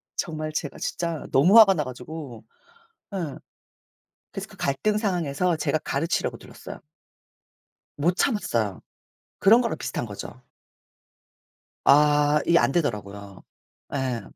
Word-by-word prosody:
정말 155 Hz, -1 st, -3 dB
제가 150 Hz, -2 st, -4 dB
진짜 170 Hz, -3 st, -3 dB
너무 175 Hz, +12 st, +5 dB
화가 200 Hz, -3 st, +8 dB
나 150 Hz, -, -1 dB
가지고. 130 Hz, -1 st, -8 dB, 0.7 s
예. 165 Hz, -8 st, -4 dB, 1.0 s
그래서 -, -, -6 dB
그 -, -, -16 dB
갈등 210 Hz, +10 st, 0 dB
상황에서 180 Hz, -4 st, 0 dB
제가 155 Hz, 0 st, 0 dB
가르치려고 160 Hz, +3 st, -2 dB
들었어요. -, -, -11 dB, 1.2 s
못 175 Hz, +5 st, +1 dB
참았어요. 115 Hz, -, 0 dB, 0.6 s
그런 225 Hz, +5 st, +6 dB
거랑 235 Hz, -, -2 dB
비슷한 -, -, -4 dB
거죠. 110 Hz, +4 st, -9 dB, 1.4 s
아 150 Hz, +1 st, +4 dB
이게 170 Hz, -, +5 dB
안되더라고요. 100 Hz, -, -2 dB, 0.5 s
예. 130 Hz, -4 st, -2 dB
150 Hz, 250 characters per minute, -25 LUFS, 130-175 Hz, 1.4 s, 화가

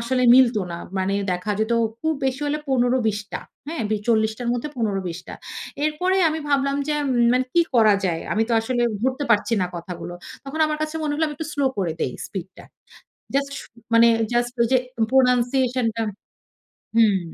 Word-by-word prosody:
আসলে 255 Hz, +2 st, 0 dB
মিলতো 245 Hz, -4 st, +5 dB
না। 170 Hz, -, -5 dB, 0.2 s
মানে 190 Hz, +1 st, 0 dB, 0.2 s
দেখা 180 Hz, +4 st, -2 dB
যেতো 220 Hz, +2 st, +1 dB, 0.3 s
খুব 315 Hz, 0 st, 0 dB
বেশি 265 Hz, +1 st, -1 dB
হলে 295 Hz, +1 st, 0 dB
১৫-২০ 245 Hz, -4 st, +2 dB
টা। -, -, -3 dB, 0.3 s
হ্যাঁ, 320 Hz, -7 st, -3 dB
বে 215 Hz, -, +2 dB
৪০ 220 Hz, -1 st, +3 dB
টার 245 Hz, -1 st, -3 dB
মধ্যে 245 Hz, +5 st, -2 dB
১৫-২০ 195 Hz, -6 st, -2 dB
টা। -, -, -6 dB, 0.5 s
এরপরেই 365 Hz, +5 st, +1 dB
আমি 315 Hz, -, -2 dB
ভাবলাম 275 Hz, 0 st, +1 dB
যে, 300 Hz, -, +1 dB
"উম -, -, 0 dB, 0.2 s
মানে 255 Hz, +1 st, +2 dB
কি 345 Hz, -, +4 dB
করা 220 Hz, -3 st, +6 dB
যায়?" 165 Hz, -3 st, -1 dB
আমি 220 Hz, -, +2 dB
তো -, -, -1 dB
আসলে 240 Hz, +2 st, -1 dB, 0.2 s
ধরতে 260 Hz, +3 st, 0 dB
পারছি 230 Hz, +1 st, +3 dB
না -, -, +1 dB
কথাগুলো। 175 Hz, 0 st, -7 dB, 0.3 s
তখন 280 Hz, +4 st, -5 dB
আমার 305 Hz, 0 st, -2 dB
কাছে 310 Hz, +1 st, -3 dB
মনে 300 Hz, -1 st, -1 dB
হলো 315 Hz, +2 st, +1 dB
আমি 295 Hz, -, -5 dB
একটু 315 Hz, +1 st, -5 dB
স্লো 285 Hz, -, 0 dB
করে 175 Hz, -4 st, 0 dB
দেই 125 Hz, -, -1 dB
স্পিডটা। 190 Hz, -1 st, -8 dB, 0.7 s
জাস্ট 280 Hz, 0 st, 0 dB
শু -, -, -10 dB, 0.3 s
মানে 230 Hz, +1 st, +7 dB, 0.3 s
জাস্ট 240 Hz, 0 st, +1 dB
ওই 235 Hz, -, +3 dB
যে 260 Hz, -, +6 dB, 0.3 s
প্রনানসিয়েশন 250 Hz, -1 st, +3 dB
টা 230 Hz, -, -1 dB, 0.9 s
হুম। 215 Hz, -4 st, +4 dB
245 Hz, 185 wpm, -23 LUFS, 215-275 Hz, 0.9 s, মানে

